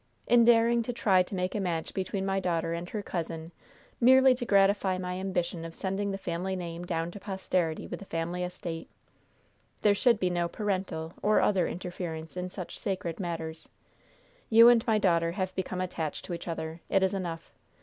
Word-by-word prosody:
In 240 Hz, -1 st, +5 dB
daring 235 Hz, 0 st, +5 dB
to 245 Hz, +2 st, -3 dB
try 195 Hz, -5 st, +4 dB
to 180 Hz, +2 st, -4 dB
make 185 Hz, 0 st, -1 dB
a 210 Hz, -, -1 dB
match 170 Hz, -4 st, -2 dB
between 190 Hz, 0 st, -2 dB
my 195 Hz, 0 st, +1 dB
daughter 170 Hz, -3 st, -1 dB
and 170 Hz, +1 st, -5 dB
her 210 Hz, -2 st, -4 dB
cousin 165 Hz, -2 st, -4 dB, 0.5 s
merely 260 Hz, +2 st, +7 dB
to 245 Hz, -1 st, -4 dB
gratify 195 Hz, -1 st, +3 dB
my 180 Hz, 0 st, -4 dB
ambition 180 Hz, -3 st, -2 dB
of 165 Hz, 0 st, -8 dB
sending 200 Hz, +1 st, -2 dB
the 195 Hz, -, -2 dB
family 185 Hz, +1 st, -3 dB
name 175 Hz, -1 st, -5 dB
down 170 Hz, -1 st, -2 dB
to 205 Hz, -, -9 dB
posterity 185 Hz, -4 st, -1 dB
with -, -, -6 dB
the 200 Hz, -, -10 dB
family 170 Hz, +1 st, -3 dB
estate. 180 Hz, -2 st, -5 dB, 0.9 s
There 210 Hz, -, +6 dB
should 230 Hz, +1 st, +3 dB
be 180 Hz, -1 st, +1 dB
no 175 Hz, -1 st, 0 dB
'parental' 185 Hz, -4 st, -3 dB
or 215 Hz, +1 st, +4 dB
other 190 Hz, -4 st, +2 dB
interference 175 Hz, -3 st, -6 dB
in 180 Hz, 0 st, -3 dB
such 180 Hz, -1 st, -7 dB
sacred 185 Hz, -3 st, -3 dB
matters. 165 Hz, -3 st, -5 dB, 0.8 s
You 230 Hz, +1 st, +9 dB
and 235 Hz, -2 st, +5 dB
my 220 Hz, -1 st, +4 dB
daughter 170 Hz, -4 st, +2 dB
have 185 Hz, 0 st, -2 dB
become 185 Hz, 0 st, -3 dB
attached 165 Hz, -4 st, -4 dB
to 175 Hz, -, -5 dB
each 170 Hz, -, -6 dB
other. 165 Hz, 0 st, -4 dB
It 195 Hz, -1 st, +3 dB
is 190 Hz, -, +2 dB
enough. 170 Hz, -4 st, -4 dB
185 Hz, 190 wpm, -29 LUFS, 170-200 Hz, 0.9 s, You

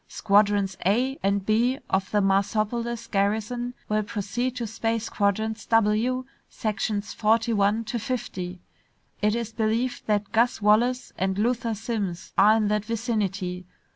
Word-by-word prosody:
Squadrons 200 Hz, -2 st, +2 dB
A 250 Hz, +8 st, +1 dB
and 195 Hz, 0 st, 0 dB
B 235 Hz, +5 st, +2 dB
of 190 Hz, 0 st, 0 dB
the 210 Hz, -, +2 dB
Marsopolis 215 Hz, +4 st, 0 dB
garrison 220 Hz, +5 st, -1 dB
will 215 Hz, 0 st, +1 dB
proceed 235 Hz, +4 st, -3 dB
to 240 Hz, -2 st, -3 dB
space 225 Hz, +1 st, -2 dB
quadrants 220 Hz, +2 st, -1 dB
W, 225 Hz, +3 st, +2 dB, 0.2 s
sections 210 Hz, -1 st, -2 dB
forty 225 Hz, +2 st, +2 dB
one 205 Hz, +2 st, +2 dB
to 235 Hz, +2 st, -3 dB
fifty. 185 Hz, -7 st, -4 dB, 0.6 s
It 210 Hz, +1 st, +2 dB
is 230 Hz, -1 st, -3 dB
believed 230 Hz, +3 st, -1 dB
that 210 Hz, -1 st, 0 dB
Gus 235 Hz, +2 st, +2 dB
Wallace 230 Hz, +5 st, +2 dB
and 190 Hz, +1 st, 0 dB
Luther 230 Hz, +1 st, 0 dB
Simms 205 Hz, -5 st, -4 dB
are 210 Hz, +2 st, +6 dB
in 215 Hz, -2 st, +1 dB
that 210 Hz, 0 st, 0 dB
vicinity. 200 Hz, -6 st, -2 dB
215 Hz, 140 wpm, -25 LUFS, 200-235 Hz, 0.6 s, are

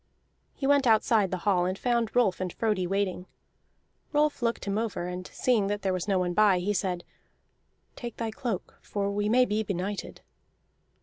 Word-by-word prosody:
He 270 Hz, -, -4 dB
went 280 Hz, -1 st, +4 dB
outside 220 Hz, -2 st, +4 dB
the 185 Hz, -, -2 dB
hall 180 Hz, -3 st, +3 dB
and 185 Hz, +1 st, -2 dB
found 235 Hz, -2 st, 0 dB
Rolf 230 Hz, -7 st, +3 dB
and 185 Hz, -1 st, -2 dB
Frodi 210 Hz, -4 st, 0 dB
waiting. 190 Hz, -1 st, -1 dB, 0.9 s
Rolf 295 Hz, -1 st, +2 dB
looked 235 Hz, -1 st, -1 dB
him 200 Hz, +1 st, 0 dB
over, 220 Hz, -6 st, -2 dB
and 180 Hz, 0 st, -5 dB
seeing 230 Hz, -6 st, +1 dB
there 200 Hz, -2 st, -1 dB
was 185 Hz, +1 st, -3 dB
no 195 Hz, -2 st, +2 dB
one 180 Hz, -1 st, 0 dB
by, 205 Hz, -1 st, +5 dB
he 190 Hz, +4 st, 0 dB
said: 185 Hz, -3 st, -1 dB, 0.9 s
"Take 240 Hz, -2 st, -7 dB
thy 225 Hz, -1 st, -2 dB
cloak, 220 Hz, -4 st, -4 dB
for 200 Hz, -1 st, -2 dB
we 205 Hz, +1 st, 0 dB
may 250 Hz, +3 st, +5 dB
be 215 Hz, -1 st, 0 dB
benighted." 200 Hz, 0 st, -4 dB
205 Hz, 175 wpm, -28 LUFS, 185-230 Hz, 0.9 s, by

